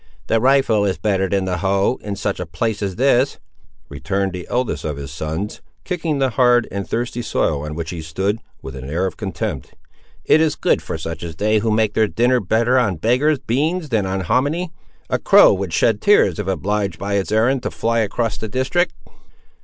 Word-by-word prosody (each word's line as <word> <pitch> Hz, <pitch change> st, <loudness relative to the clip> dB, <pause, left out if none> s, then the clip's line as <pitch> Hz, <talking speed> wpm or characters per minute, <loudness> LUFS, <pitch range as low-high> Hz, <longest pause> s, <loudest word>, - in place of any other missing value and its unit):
"The 115 Hz, -, +2 dB
rifle 130 Hz, -5 st, +3 dB
is 95 Hz, -4 st, 0 dB
better 95 Hz, +1 st, 0 dB
than 95 Hz, 0 st, 0 dB
the 90 Hz, -1 st, -1 dB
hoe, 100 Hz, +5 st, +1 dB
in 100 Hz, -1 st, -4 dB
such 100 Hz, 0 st, -3 dB
a 90 Hz, -, -4 dB
place 110 Hz, +5 st, -2 dB
as 95 Hz, -3 st, -2 dB
this," 130 Hz, +1 st, +2 dB, 0.5 s
returned 95 Hz, +6 st, -2 dB
the 90 Hz, -1 st, -7 dB
eldest 125 Hz, -1 st, -1 dB
of 75 Hz, -2 st, -3 dB
his 70 Hz, -1 st, -7 dB
sons, 80 Hz, +7 st, -4 dB, 0.2 s
kicking 165 Hz, -5 st, -2 dB
the 135 Hz, -2 st, +1 dB
hard 120 Hz, -1 st, +3 dB
and 100 Hz, -1 st, -5 dB
thirsty 120 Hz, +1 st, -2 dB
soil 75 Hz, -10 st, 0 dB
on 75 Hz, +1 st, -5 dB
which 80 Hz, -1 st, -4 dB
he 85 Hz, -2 st, -5 dB
stood, 95 Hz, +7 st, -2 dB, 0.2 s
with 65 Hz, -, -7 dB
an 65 Hz, -, -7 dB
air 85 Hz, +5 st, 0 dB
of 95 Hz, -, -3 dB
contempt. 95 Hz, -6 st, -5 dB, 0.5 s
"It 155 Hz, -, +5 dB
is 160 Hz, -2 st, +2 dB
good -, -, +1 dB
for -, -, -5 dB
such 80 Hz, +1 st, -6 dB
as 85 Hz, -2 st, -6 dB
they 105 Hz, +5 st, +2 dB
who 110 Hz, +2 st, -1 dB
make 110 Hz, -1 st, +1 dB
their 110 Hz, 0 st, +3 dB
dinner 125 Hz, +4 st, +2 dB
better 115 Hz, +6 st, +2 dB
on 105 Hz, -7 st, +1 dB
beggars' 130 Hz, -, +2 dB
beans 155 Hz, +8 st, -1 dB
than 110 Hz, -5 st, 0 dB
on 95 Hz, 0 st, -2 dB
homminy. 145 Hz, -, 0 dB, 0.4 s
A -, -, 0 dB
crow -, -, +6 dB
would 95 Hz, -2 st, -3 dB
shed 110 Hz, +4 st, +2 dB
tears 205 Hz, -, +4 dB
if 105 Hz, -, -3 dB
obliged 100 Hz, -1 st, -1 dB
by 100 Hz, +3 st, -3 dB
its 100 Hz, 0 st, -1 dB
errand 120 Hz, +5 st, +2 dB
to -, -, -3 dB
fly 115 Hz, 0 st, 0 dB
across 110 Hz, +1 st, -1 dB
the 110 Hz, -, -4 dB
district." 135 Hz, -, 0 dB
105 Hz, 205 wpm, -20 LUFS, 95-125 Hz, 0.5 s, crow